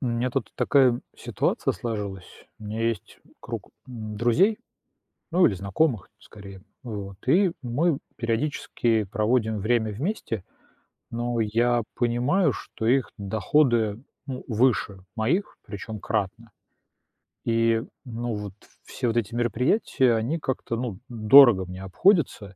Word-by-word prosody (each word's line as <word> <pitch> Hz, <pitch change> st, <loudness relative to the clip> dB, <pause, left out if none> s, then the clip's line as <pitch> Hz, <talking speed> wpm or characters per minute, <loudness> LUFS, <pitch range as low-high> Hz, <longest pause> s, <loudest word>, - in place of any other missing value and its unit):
У 130 Hz, -, -2 dB
меня 120 Hz, +2 st, 0 dB
тут 135 Hz, -, -2 dB
такая, 130 Hz, -4 st, +3 dB, 0.2 s
ситуация -, -, -1 dB
сложилась. 100 Hz, -5 st, -6 dB
У 110 Hz, -, -12 dB
меня 110 Hz, +2 st, -4 dB
есть 115 Hz, -, -5 dB, 0.2 s
круг -, -, -7 dB, 0.2 s
друзей. 120 Hz, -, +1 dB, 0.7 s
Ну, 180 Hz, +1 st, +5 dB
или 100 Hz, -, +1 dB
знакомых, 105 Hz, -, 0 dB
скорее, 100 Hz, -2 st, -12 dB, 0.2 s
вот. 100 Hz, -5 st, -6 dB
И 180 Hz, +3 st, +4 dB
мы 140 Hz, +6 st, +1 dB, 0.2 s
периодически 115 Hz, -2 st, 0 dB
проводим 110 Hz, +2 st, 0 dB
время 110 Hz, +1 st, +1 dB
вместе. 115 Hz, -, -3 dB, 0.7 s
Но 120 Hz, 0 st, -2 dB
я 120 Hz, +2 st, +2 dB
понимаю, 130 Hz, +7 st, +2 dB
что 110 Hz, -, -6 dB
их 130 Hz, +2 st, +2 dB
доходы, 110 Hz, +2 st, +1 dB, 0.2 s
ну, 130 Hz, -2 st, -6 dB
выше 115 Hz, -4 st, +1 dB, 0.2 s
моих, 160 Hz, -, 0 dB
причём 105 Hz, +1 st, -7 dB
кратно. 110 Hz, +2 st, -3 dB, 1.0 s
И, 115 Hz, 0 st, +2 dB, 0.2 s
ну 120 Hz, -1 st, -4 dB
вот, 105 Hz, -2 st, -6 dB, 0.3 s
все -, -, -4 dB
вот 115 Hz, 0 st, 0 dB
эти 115 Hz, -1 st, -1 dB
мероприятия 125 Hz, -, +2 dB
они 120 Hz, +9 st, -1 dB
как-то, 130 Hz, -4 st, -3 dB
ну, 115 Hz, -6 st, -4 dB
дорого 115 Hz, -3 st, +7 dB
мне 90 Hz, +1 st, -8 dB
обходятся. 110 Hz, -, +2 dB
115 Hz, 120 wpm, -25 LUFS, 105-130 Hz, 1.0 s, дорого